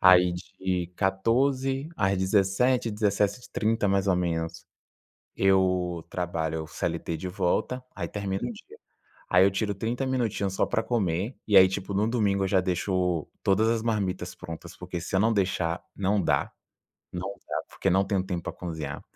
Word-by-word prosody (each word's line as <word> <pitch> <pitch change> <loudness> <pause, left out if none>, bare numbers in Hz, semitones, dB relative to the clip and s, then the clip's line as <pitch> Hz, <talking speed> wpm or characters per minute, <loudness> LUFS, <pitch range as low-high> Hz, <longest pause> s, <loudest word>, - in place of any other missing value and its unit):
Aí, 90 -1 +7
de 90 0 -3
14h 130 +8 +1
às 95 -1 +2
17h, 100 +6 +2
17:30, 105 +1 0
mais 100 0 +2
ou 90 - +4
menos, 85 -1 -2 0.7
eu 90 -3 +2
trabalho 80 -3 -2
o - - -10
CLT 80 - -3
de 80 +4 -5
volta. 95 +7 -1
Aí 85 -4 -3
termina 100 -1 -3
o - - -2
dia. 385 - -13 0.5
Aí 90 0 +6
eu 100 - +4
tiro 105 +2 -1
30 115 +6 -2
minutinhos 115 -7 -1
só - - +2
para 110 - 0
comer 100 0 -1
e 105 - +3
aí, 95 0 +9
tipo, 95 +1 -4
no 100 +2 +2
domingo 105 -5 +1
eu - - +1
já 95 0 +3
deixo 90 -2 0
todas 100 +3 +3
as 115 -1 +1
marmitas 100 -5 -1
prontas, 85 0 -9
porque 90 -1 -5
se 85 - -4
eu - - +4
não 110 +2 +3
deixar, 90 -4 0
não 100 +1 +1
dá, - - +1 0.6
não 90 +2 -4 0.2
dá, - - -2
porque - - -1
não 95 +2 +4
tenho 100 -2 0
tempo 90 -2 -3
para - - -4
cozinhar. 80 -5 -5
95 Hz, 170 wpm, -27 LUFS, 90-105 Hz, 0.7 s, aí